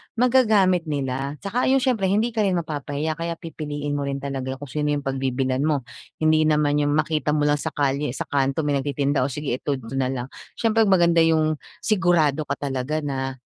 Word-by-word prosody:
magagamit 215 Hz, -8 st, +3 dB
nila. 140 Hz, -1 st, -2 dB
'Tsaka 230 Hz, +7 st, 0 dB
yung 265 Hz, 0 st, +3 dB
syempre 225 Hz, -7 st, +1 dB
hindi 215 Hz, +5 st, +1 dB
ka 225 Hz, -, -4 dB
rin 195 Hz, -4 st, +2 dB
mapapahiya 155 Hz, 0 st, -3 dB
kaya 170 Hz, 0 st, -2 dB
pipiliin 145 Hz, -3 st, -4 dB
mo 140 Hz, -, -2 dB
rin 140 Hz, -, -2 dB
talaga 135 Hz, -1 st, -4 dB
kung 135 Hz, -1 st, -10 dB
sino 150 Hz, -1 st, 0 dB
yung 145 Hz, -, -4 dB
pagbibilhan 130 Hz, -1 st, -1 dB
mo. 145 Hz, -3 st, +1 dB, 0.4 s
Hindi 155 Hz, 0 st, +4 dB
naman 150 Hz, -1 st, +2 dB
yung 145 Hz, 0 st, +1 dB
makita 155 Hz, -1 st, 0 dB
mo 150 Hz, -, +1 dB
lang 145 Hz, 0 st, +2 dB
sa -, -, -2 dB
kalye, 140 Hz, -2 st, 0 dB
sa -, -, -3 dB
kanto 140 Hz, +2 st, +1 dB
may 145 Hz, -1 st, +1 dB
nagtitinda, 140 Hz, 0 st, 0 dB
"Oh, 130 Hz, -, +1 dB
sige 135 Hz, -2 st, -3 dB
ito 145 Hz, -, -1 dB
d, 130 Hz, -, -10 dB
ito 115 Hz, -, -9 dB
na 130 Hz, -, +1 dB
lang." 130 Hz, -1 st, -3 dB, 0.3 s
siyempre 225 Hz, -2 st, +2 dB
maganda 170 Hz, -3 st, +4 dB
yung 155 Hz, -2 st, +3 dB, 0.2 s
sigurado 165 Hz, -7 st, +2 dB
ka -, -, -1 dB
talaga 140 Hz, +2 st, -2 dB
na, 135 Hz, -2 st, -3 dB
150 Hz, 200 wpm, -23 LUFS, 140-170 Hz, 0.4 s, Hindi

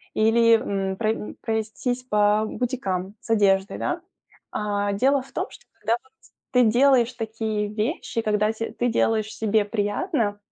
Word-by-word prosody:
или, 230 Hz, +1 st, +5 dB
м, 195 Hz, -1 st, -2 dB
про, 220 Hz, -1 st, +1 dB
м, 210 Hz, -, -5 dB
пройтись 225 Hz, +3 st, -2 dB
по 210 Hz, -2 st, +3 dB
бутикам 200 Hz, -7 st, -3 dB
с -, -, -15 dB
одеждой, 200 Hz, -2 st, +3 dB
да? -, -, -2 dB, 0.5 s
А, 205 Hz, -1 st, -1 dB
дело 270 Hz, +6 st, +3 dB
в 265 Hz, -, -15 dB
том, -, -, -2 dB
что 485 Hz, -, -15 dB
когда 225 Hz, -, +1 dB
вот 265 Hz, -, -27 dB, 0.4 s
ты 250 Hz, -1 st, +5 dB
делаешь 250 Hz, +1 st, +4 dB
такие 220 Hz, -2 st, -2 dB
вещи, 225 Hz, +3 st, -2 dB
когда 210 Hz, 0 st, +1 dB
те 225 Hz, 0 st, -5 dB
ты 245 Hz, -, 0 dB
делаешь 220 Hz, -1 st, +1 dB
себе 215 Hz, -1 st, +1 dB
приятно, 205 Hz, -, -1 dB
220 Hz, 155 wpm, -24 LUFS, 205-240 Hz, 0.5 s, или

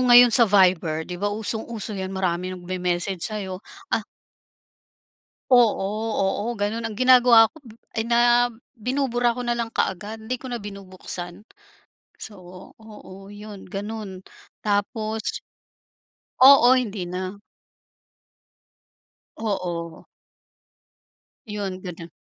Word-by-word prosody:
ngayon 245 Hz, -1 st, +8 dB
sa 245 Hz, -, +8 dB
Viber, 180 Hz, -5 st, +3 dB
di 180 Hz, -, -6 dB
ba 205 Hz, +3 st, -2 dB
usong-uso 220 Hz, 0 st, -1 dB
yan 190 Hz, -1 st, -4 dB
maraming 185 Hz, -1 st, -2 dB
mag-memessage 180 Hz, 0 st, -2 dB
sayo 195 Hz, -3 st, -4 dB, 0.3 s
ah -, -, +1 dB, 1.5 s
Oo, 235 Hz, -6 st, +4 dB, 0.4 s
oo 195 Hz, +3 st, -1 dB
ganun 215 Hz, +2 st, -2 dB
ang 225 Hz, -, -6 dB
ginagawa 245 Hz, -1 st, +6 dB
ko -, -, -40 dB, 0.4 s
ay 220 Hz, -, 0 dB
na 240 Hz, +1 st, +4 dB, 0.3 s
binubura 245 Hz, 0 st, 0 dB
ko 250 Hz, -, -5 dB
nalang 235 Hz, -1 st, -2 dB
kaagad 210 Hz, +4 st, -2 dB
hindi 245 Hz, +3 st, -3 dB
ko 260 Hz, -, -10 dB
na 235 Hz, -3 st, -4 dB
binubuksan. 185 Hz, -2 st, -8 dB, 0.8 s
So 205 Hz, -3 st, -9 dB, 0.4 s
oo 205 Hz, -3 st, -13 dB
yun, 205 Hz, -1 st, -10 dB
ganun, 200 Hz, -1 st, -6 dB, 0.4 s
tapos 215 Hz, +1 st, -2 dB, 1.0 s
oo, 260 Hz, -1 st, +8 dB
hindi 215 Hz, -7 st, -2 dB
na. 185 Hz, +3 st, -6 dB, 2.0 s
Oo. 175 Hz, -6 st, -4 dB, 1.4 s
Yun, 200 Hz, -3 st, -5 dB
ganun. 170 Hz, -2 st, -8 dB
205 Hz, 100 wpm, -23 LUFS, 185-230 Hz, 2.0 s, ngayon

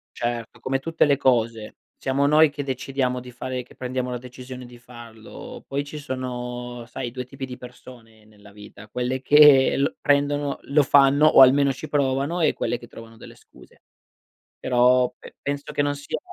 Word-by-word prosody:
Certo, 120 Hz, -1 st, -4 dB
come 135 Hz, 0 st, -2 dB
tutte 165 Hz, +3 st, +1 dB
le 140 Hz, -1 st, +3 dB
cose, 115 Hz, -4 st, 0 dB, 0.2 s
siamo 135 Hz, +1 st, -1 dB
noi 155 Hz, +1 st, +5 dB
che 145 Hz, 0 st, -6 dB
decidiamo 130 Hz, -1 st, -2 dB
di 125 Hz, 0 st, -11 dB
fare 125 Hz, +1 st, -5 dB
che 125 Hz, -, -18 dB
prendiamo 125 Hz, 0 st, -4 dB
la 125 Hz, -, -3 dB
decisione 125 Hz, +1 st, -10 dB
di 120 Hz, 0 st, -14 dB
farlo, 120 Hz, -2 st, -12 dB
poi 140 Hz, +1 st, -2 dB
ci 150 Hz, +1 st, -8 dB
sono, 125 Hz, -3 st, -6 dB
sai 125 Hz, -1 st, -6 dB
2 125 Hz, 0 st, -5 dB
tipi 135 Hz, +1 st, -8 dB
di 125 Hz, -1 st, -8 dB
persone 120 Hz, -3 st, -15 dB
nella 105 Hz, -1 st, -18 dB
vita, 105 Hz, +1 st, -14 dB
quelle 125 Hz, +3 st, -3 dB
che 140 Hz, -1 st, +5 dB
prendono, 145 Hz, 0 st, +1 dB
lo 145 Hz, +1 st, +2 dB
fanno 140 Hz, +2 st, +5 dB
o 135 Hz, -, +7 dB
almeno 135 Hz, +1 st, +6 dB
ci 135 Hz, +4 st, -8 dB
provano 140 Hz, +4 st, -1 dB
e -, -, +3 dB
quelle 120 Hz, -, -3 dB
che 120 Hz, -, -13 dB
trovano 115 Hz, -1 st, -13 dB
delle -, -, -14 dB
scuse. -, -, -21 dB, 0.8 s
Però, 125 Hz, 0 st, +3 dB
pe -, -, -15 dB
penso 140 Hz, 0 st, -5 dB
che 145 Hz, -, 0 dB
non 145 Hz, 0 st, -1 dB
sia 145 Hz, -, -5 dB
130 Hz, 175 wpm, -23 LUFS, 120-140 Hz, 0.8 s, o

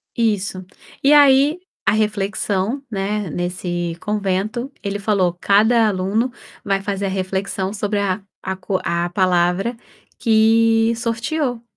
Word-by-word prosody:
Isso. 205 Hz, -5 st, 0 dB, 0.4 s
E 275 Hz, -, +5 dB
aí, 290 Hz, +2 st, +6 dB, 0.3 s
a 195 Hz, -, +4 dB
reflexão, 210 Hz, +3 st, -1 dB
né, 205 Hz, -1 st, -2 dB
nesse 175 Hz, 0 st, -3 dB
convento, 210 Hz, +5 st, -2 dB
ele 200 Hz, 0 st, -3 dB
falou: 195 Hz, -4 st, +1 dB
"Cada 220 Hz, +3 st, +4 dB
aluno 205 Hz, +5 st, 0 dB, 0.3 s
vai 195 Hz, -1 st, 0 dB
fazer 200 Hz, -1 st, -2 dB
a -, -, -1 dB
reflexão 190 Hz, 0 st, -2 dB
sobre 205 Hz, -1 st, -1 dB
a 200 Hz, 0 st, -1 dB, 0.2 s
a 190 Hz, 0 st, -2 dB
co 190 Hz, 0 st, -2 dB
a 170 Hz, 0 st, -1 dB
palavra 180 Hz, +4 st, +1 dB, 0.4 s
que 225 Hz, 0 st, +4 dB
sorteou". 235 Hz, +2 st, -2 dB
205 Hz, 120 wpm, -20 LUFS, 190-225 Hz, 0.4 s, aí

